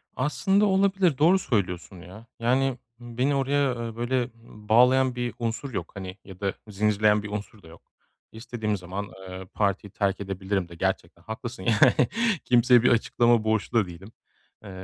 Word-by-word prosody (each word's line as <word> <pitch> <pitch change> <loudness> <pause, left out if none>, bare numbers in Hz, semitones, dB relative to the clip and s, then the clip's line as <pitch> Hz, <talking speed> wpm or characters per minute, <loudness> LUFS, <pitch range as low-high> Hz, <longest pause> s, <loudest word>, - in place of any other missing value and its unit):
Aslında 195 +9 +1
olabilir, 190 -5 +2
doğru 170 +7 +5
söylüyorsun 95 - -2
ya, 95 +5 -12
yani 130 +2 +1 0.2
beni 125 +4 -1
oraya, 140 0 +1
eee, 115 - -8
böyle, 120 +3 -2
ııı, 120 - -4 0.4
bağlayan 125 +3 +4
bir 120 -1 -3
unsur 115 +3 -3
yok, 85 -5 -4
hani, 95 -1 -7
ya 95 -2 -12
da 100 -1 -1
zincirleyen 105 0 +2
bir 105 - -6
unsur 105 0 -6
da - - -14
yok. 80 0 -15 0.5
İstediğim 110 -2 -3
zaman, 95 +3 -6 0.2
eee, 95 0 -8
partiyi 100 -1 -1
terk 100 -1 -1
edebilirim 95 -1 -3
de 85 - -11
gerçekten - - -3
haklısın 110 -1 -7
yani. 115 +2 +4 0.4
Kimseye 125 0 +5
bir 125 - +5
açıklama 120 -1 +3
borçlu 110 +1 0
da 100 - 0
değilim. 90 +5 -11 0.5
Eee, 105 - -10
110 Hz, 160 wpm, -26 LUFS, 100-125 Hz, 0.5 s, doğru